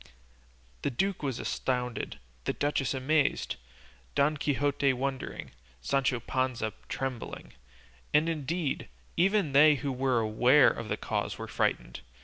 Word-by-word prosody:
The - - 0
duke 190 +9 -1
was 135 -5 -2
astounded, 125 -2 -2 0.3
the - - 0
duchess 145 -2 0
amazed, 145 +3 +1 0.6
Don 145 +2 +3
Quixote 145 -1 +1
wondering, 135 +1 -4 0.3
Sancho 130 - +1
Panza 125 -3 -1 0.2
trembling, 130 -3 -5 0.6
and 150 +2 +4
indeed, 160 - -2 0.3
even 195 -3 +3
they 150 +2 +7
who 140 0 -2
were 130 -1 +1
aware 120 +5 +5
of 110 - -6
the - - -1
cause - - -2
were - - -6
frightened. - - -1
135 Hz, 125 wpm, -29 LUFS, 125-150 Hz, 0.6 s, they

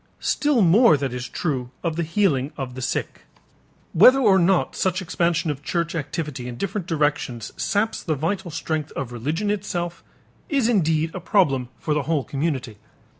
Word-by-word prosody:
Still 290 -7 +2
more 185 - +6
that 135 -3 -3
is 125 0 -5
true 130 -7 -2
of 165 -2 -1
the 170 - -1
healing 160 -5 +1
of 130 -2 -5
the 130 - -7
sick. - - -3 0.7
Whether 250 +10 +7
or 205 -8 +5
not 180 +1 +2
such 185 -1 0
expansion 170 -2 0
of 145 -1 -6
church 170 +2 -2
activity 150 -4 -4
in 120 -1 -6
different 195 - -3
directions 145 - -1
saps 215 +2 0
the 155 - -1
vital 175 +5 -2
strength 155 -1 -3
of 130 -3 -4
religion 155 - -2
itself 175 -4 -3 0.5
is 275 -6 +2
indeed 160 -7 +1
a 185 - -4
problem 135 - +1
for 155 - -1
the 150 - +1
whole 155 -4 +1
community. 135 -5 -3
165 Hz, 170 wpm, -23 LUFS, 140-190 Hz, 0.7 s, Whether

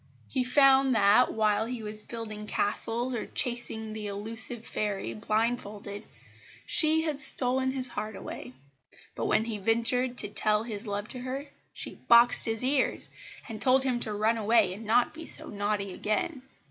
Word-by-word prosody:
He 260 - -1
found 270 0 +4
that, 215 +4 +5
while 215 0 +1
he 240 -2 -5
was 215 0 -4
building 215 -2 -7
castles 230 +5 0
or 235 - -4
chasing 225 -3 -2
the 215 -1 -5
elusive 225 +3 -1
fairy 200 - -3
blindfolded, 210 - -3 0.6
she 315 -1 +3
had 305 -3 -2
stolen 260 -1 +1
his 260 -1 -3
heart 215 -2 -5
away; 125 - -8 0.6
but - - -3
when 220 - +2
he 220 -3 -4
ventured 235 +4 +1
to - - +2
tell 210 +1 +1
his 220 -1 -6
love 205 +1 -3
to 255 - -2
her 260 +3 -5 0.3
she - - -7
boxed 235 +1 +6
his 225 +1 -1
ears, 265 +1 +1 0.4
and 225 -3 -7
told 260 0 +5
him 255 -2 0
to 220 - +2
run 220 +2 +1
away 220 -3 +3
and 215 +4 -9
not 245 +7 +2
be 320 0 -9
so 310 0 -1
naughty 205 -1 -2
again. 255 - -2
225 Hz, 165 wpm, -28 LUFS, 210-255 Hz, 0.6 s, boxed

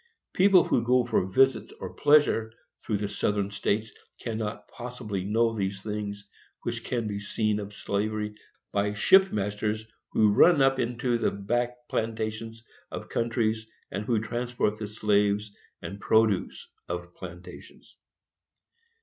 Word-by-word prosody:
People 190 -1 +6
who 115 - +1
go 125 +1 +3
for 95 -6 +1
visits 130 +4 +3
or - - -6
pleasure 145 -7 +4 0.3
through 105 - 0
the 100 0 -2
Southern 100 0 -1
States 105 +2 -1 0.3
cannot 110 -2 -4
possibly 120 -6 -5
know 115 +3 +1
those 95 -2 -2
things 105 -1 -5 0.4
which - - -3
can 120 -2 -2
be 100 -1 -3
seen 105 +1 0
of 105 0 -7
slavery 105 +1 -2 0.4
by 105 0 0
ship 190 - +6
masters 105 +1 -2 0.3
who 105 -2 +4
run 170 +7 +6
up 135 0 +4
into 120 0 0
the - - +2
back 120 +4 -2
plantations 110 0 -3 0.3
of - - -7
countries, 110 -1 0 0.2
and 100 +2 -3
who 115 -2 +2
transport 120 -1 -1
the 105 - -4
slaves 105 -1 +1 0.3
and 100 +1 -7
produce 110 -4 +2 0.2
of 85 0 -5
plantations. 90 0 -11
110 Hz, 135 wpm, -27 LUFS, 100-120 Hz, 0.4 s, People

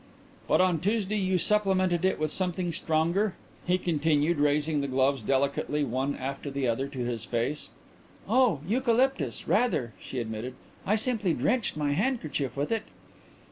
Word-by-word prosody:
"But - - +4
on 180 -3 +2
Tuesday 210 +3 0
you 190 -1 +1
supplemented 185 -2 +2
it 190 - +2
with 155 -1 0
something 180 -1 -1
stronger," 170 +6 +1 0.3
he 180 +1 +3
continued, 160 -2 +1
raising 150 +1 +2
the 140 - -2
gloves 135 0 +1
delicately 140 +4 0
one 135 +2 -1
after 135 +2 -5
the 135 -1 -1
other 120 +4 0
to 140 -2 -8
his 120 -3 -3
face. 120 +5 -2 0.6
"Oh, 225 - +3
eucalyptus; 235 - +1
rather," 205 - +1
she 130 - -7
admitted. 115 +2 -5 0.3
"I 210 - +4
simply 215 -6 0
drenched 235 -7 0
my 145 -1 0
handkerchief 155 - -1
with 145 +7 -1
it." 225 -1 +1
155 Hz, 150 wpm, -28 LUFS, 140-195 Hz, 0.6 s, But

